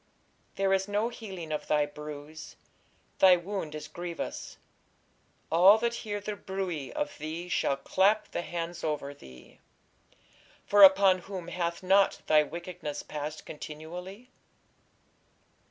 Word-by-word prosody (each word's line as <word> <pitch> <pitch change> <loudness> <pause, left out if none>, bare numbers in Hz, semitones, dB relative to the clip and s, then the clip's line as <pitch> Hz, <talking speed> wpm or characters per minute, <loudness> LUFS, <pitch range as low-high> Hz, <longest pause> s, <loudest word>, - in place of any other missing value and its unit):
There 195 0 +2
is 190 0 +1
no 205 +3 0
healing 190 -9 -8
of 150 -1 -3
thy 150 -1 +3
bruise; 150 +1 -9 0.6
thy 185 -1 +8
wound 175 -4 -5
is 150 0 -6
grievous: 170 +2 -6 0.9
all 185 +6 +7
that 235 +1 0
hear 205 -2 -3
the 205 +1 -5
bruit 190 -8 -4
of 295 - -3
thee 160 +3 -5
shall 140 - +1
clap 200 +8 +2
the - - -2
hands 170 0 -5
over 150 -2 -2
thee: 65 - -15 1.1
for 205 0 +4
upon 190 -1 +8
whom 180 -2 -7
hath 170 0 -3
not 195 +2 +3
thy 155 -1 +5
wickedness 160 -2 -6
passed 150 +1 -6
continually? 180 +10 -9
175 Hz, 125 wpm, -29 LUFS, 155-195 Hz, 1.1 s, thy